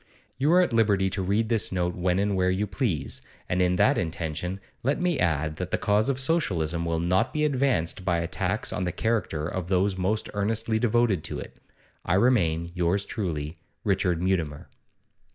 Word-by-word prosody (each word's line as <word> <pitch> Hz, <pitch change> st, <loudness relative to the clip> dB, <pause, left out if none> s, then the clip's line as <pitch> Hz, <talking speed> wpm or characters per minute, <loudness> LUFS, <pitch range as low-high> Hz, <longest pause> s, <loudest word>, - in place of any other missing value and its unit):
You 145 Hz, +4 st, +3 dB
are 180 Hz, -, +6 dB
at 155 Hz, -, -2 dB
liberty 100 Hz, -4 st, +3 dB
to 95 Hz, 0 st, -2 dB
read 100 Hz, +4 st, +1 dB
this 115 Hz, -4 st, +1 dB
note 90 Hz, -1 st, 0 dB
when 90 Hz, +1 st, 0 dB
and 100 Hz, 0 st, +1 dB
where 90 Hz, 0 st, +2 dB
you 95 Hz, +3 st, 0 dB
please, 90 Hz, -, -2 dB, 0.3 s
and 90 Hz, +1 st, 0 dB
in 90 Hz, 0 st, +3 dB
that 105 Hz, +9 st, +3 dB
intention 85 Hz, +2 st, -3 dB, 0.2 s
let 140 Hz, +7 st, 0 dB
me 175 Hz, -4 st, +1 dB
add 75 Hz, -2 st, 0 dB
that 90 Hz, 0 st, -4 dB
the -, -, 0 dB
cause 105 Hz, +3 st, +2 dB
of 135 Hz, -1 st, 0 dB
Socialism 85 Hz, -, 0 dB
will 85 Hz, -1 st, 0 dB
not 90 Hz, +3 st, +1 dB
be 150 Hz, 0 st, 0 dB
advanced 125 Hz, -, 0 dB
by 90 Hz, -2 st, +1 dB
attacks 90 Hz, +4 st, -1 dB
on 90 Hz, -, -2 dB
the 90 Hz, -, -1 dB
character 95 Hz, -10 st, -1 dB
of 90 Hz, 0 st, -4 dB
those 95 Hz, +1 st, +1 dB
most 105 Hz, +4 st, 0 dB
earnestly 110 Hz, +2 st, 0 dB
devoted 120 Hz, -6 st, +2 dB
to -, -, -4 dB
it. -, -, -9 dB, 0.5 s
I 90 Hz, -, +1 dB
remain, 85 Hz, -8 st, +2 dB
yours 90 Hz, +3 st, +1 dB
truly, 80 Hz, -6 st, -3 dB, 0.3 s
'RICHARD 95 Hz, -4 st, +1 dB
MUTIMER. 85 Hz, -6 st, -1 dB
95 Hz, 185 wpm, -26 LUFS, 85-110 Hz, 0.5 s, are